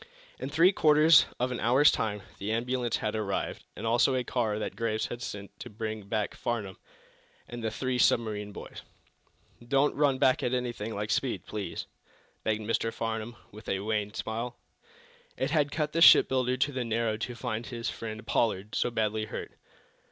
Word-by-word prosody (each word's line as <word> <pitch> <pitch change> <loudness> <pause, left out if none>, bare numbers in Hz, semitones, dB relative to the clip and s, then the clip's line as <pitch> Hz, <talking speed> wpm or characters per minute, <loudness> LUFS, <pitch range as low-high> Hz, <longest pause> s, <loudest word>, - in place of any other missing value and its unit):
In 135 - -4
three 165 +5 +5
quarters 155 -4 +6
of 125 +1 0
an 125 - -3
hour's 130 +5 +5
time 105 -3 -2 0.2
the 100 +2 -3
ambulance 120 +1 0
had 105 +1 -2
arrived, 105 -3 -3
and - - -6
also 120 +4 +3
a 125 - 0
car 115 -4 -1
that 110 - -4
Graves 110 -2 -1
had 120 - -6
sent 100 -4 -6
to - - -8
bring 110 -1 -5
back 105 -2 -1
Farnum 105 -6 -4 0.7
and 120 -1 -7
the 110 - 0
three 130 +2 -2
submarine 105 -3 +2
boys. - - -9 0.8
"Don't 135 +4 +2
run 145 -3 +2
back 130 0 +3
at 125 - 0
anything 120 -3 -3
like 105 +1 -3
speed, 130 -3 -1
please," 100 -6 -5 0.6
begged 110 0 0
Mr. 115 +1 0
Farnum, 115 +1 -4 0.2
with 105 0 -10
a 95 0 0
wan 105 -1 -1
smile. 115 +3 -4 0.8
It - - -1
had 145 -3 +2
cut 150 0 -1
the 165 - 0
shipbuilder 130 -5 +6
to 135 +3 +1
the 130 -2 -2
marrow 115 -1 0
to 120 +2 -4
find 115 -1 -4
his 115 +1 -3
friend, 110 -1 -7
Pollard, 105 -2 0
so - - +1
badly 110 -2 -1
hurt. - - -6
115 Hz, 175 wpm, -29 LUFS, 110-125 Hz, 0.8 s, quarters